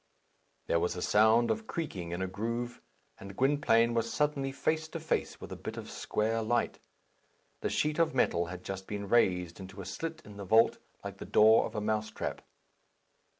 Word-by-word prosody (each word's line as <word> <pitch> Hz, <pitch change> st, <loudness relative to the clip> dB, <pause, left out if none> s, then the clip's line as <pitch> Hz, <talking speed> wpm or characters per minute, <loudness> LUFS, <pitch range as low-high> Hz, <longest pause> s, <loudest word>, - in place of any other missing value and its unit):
There 85 Hz, -, +2 dB
was 90 Hz, -, -1 dB
a 90 Hz, -, -5 dB
sound 110 Hz, +2 st, +4 dB
of 110 Hz, 0 st, -3 dB
creaking 95 Hz, -, -4 dB
in 85 Hz, +2 st, -3 dB
a -, -, -1 dB
groove, 115 Hz, +5 st, -4 dB, 0.4 s
and 100 Hz, 0 st, -10 dB
Gwynplaine 125 Hz, -4 st, +3 dB
was 115 Hz, 0 st, 0 dB
suddenly 145 Hz, -2 st, 0 dB
face 155 Hz, +3 st, -1 dB
to 165 Hz, -, -6 dB
face 160 Hz, -, -2 dB
with -, -, -9 dB
a -, -, -4 dB
bit -, -, -7 dB
of -, -, -7 dB
square 115 Hz, +1 st, -1 dB
light. 115 Hz, +2 st, 0 dB, 0.8 s
The -, -, -2 dB
sheet 150 Hz, +1 st, 0 dB
of 165 Hz, -1 st, +2 dB
metal 85 Hz, 0 st, +2 dB
had 90 Hz, +1 st, -8 dB
just 95 Hz, 0 st, -6 dB
been 100 Hz, -1 st, -4 dB
raised 90 Hz, -6 st, +2 dB
into 95 Hz, +1 st, -9 dB
a 95 Hz, -, -6 dB
slit 160 Hz, -, -5 dB
in 105 Hz, -1 st, -11 dB
the 100 Hz, -, -6 dB
vault, 110 Hz, +4 st, +4 dB, 0.2 s
like -, -, -7 dB
the -, -, -6 dB
door 110 Hz, +1 st, +5 dB
of -, -, -12 dB
a 105 Hz, -, -1 dB
mouse 110 Hz, 0 st, -1 dB
trap. -, -, -4 dB
110 Hz, 195 wpm, -31 LUFS, 95-130 Hz, 0.8 s, door